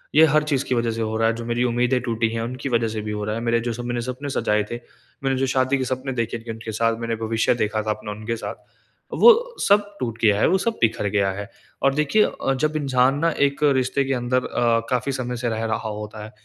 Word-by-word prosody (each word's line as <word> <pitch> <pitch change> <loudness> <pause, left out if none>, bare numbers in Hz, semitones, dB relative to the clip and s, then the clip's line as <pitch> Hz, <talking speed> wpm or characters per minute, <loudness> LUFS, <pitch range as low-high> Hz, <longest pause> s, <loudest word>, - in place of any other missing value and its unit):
ये 160 +1 +8
हर 155 0 +3
चीज़ 140 -2 0
की 130 - 0
वजह 115 -1 0
से 115 0 -4
हो 110 0 -2
रहा 115 0 +3
है, 115 - +2
जो 115 0 -6
मेरी 120 +1 0
उम्मीदें 125 +1 +1
टूटी 115 -2 0
हैं 115 - -2
उनकी 125 +4 -4
वजह 115 -2 +1
से 110 -1 -4
भी 105 0 -5
हो 105 0 -3
रहा 105 0 -2
है। 115 - -3
मेरे 115 0 +1
जो 120 - -1
सपने 120 +1 -3
सपने 130 +4 -5
सजाए 105 -5 +1
थे, - - -2 0.5
मैंने 135 0 +1
जो 135 - +1
शादी 130 +1 +2
के 130 - -1
सपने 130 +1 -3
देखे 115 0 -1
उनके 110 0 -7
साथ 115 +1 +1
मैंने 115 -1 -2
भविष्य 110 +1 +2
देखा 110 +1 -1
था 110 - -4
अपना 105 0 -5
उनके 110 +2 -4
साथ, 115 - -6 0.6
वो 475 +1 +5
सब 205 0 +3
टूट 115 -2 -3
गया 105 -2 +4
है, - - +4
वो 190 - +3
सब 230 +4 -1
बिखर 110 -2 +1
गया 100 -1 +1
है। 100 +2 -6 0.3
और 135 - +3
देखिए 150 +9 +3
अ, 135 - -1
जब 155 +3 -1
इंसान 135 -2 +2
ना 165 +2 +2 0.2
एक 140 +2 -5 0.2
रिश्ते 130 +2 0
के 135 - 0
अंदर 125 0 0
अ, 115 -1 +1
काफ़ी 125 +1 0
समय 125 0 -3
से 120 0 -1
रह 110 0 -2
रहा 110 0 -2
होता 105 0 -7
है, 110 - -11
120 Hz, 255 wpm, -23 LUFS, 110-135 Hz, 0.6 s, ये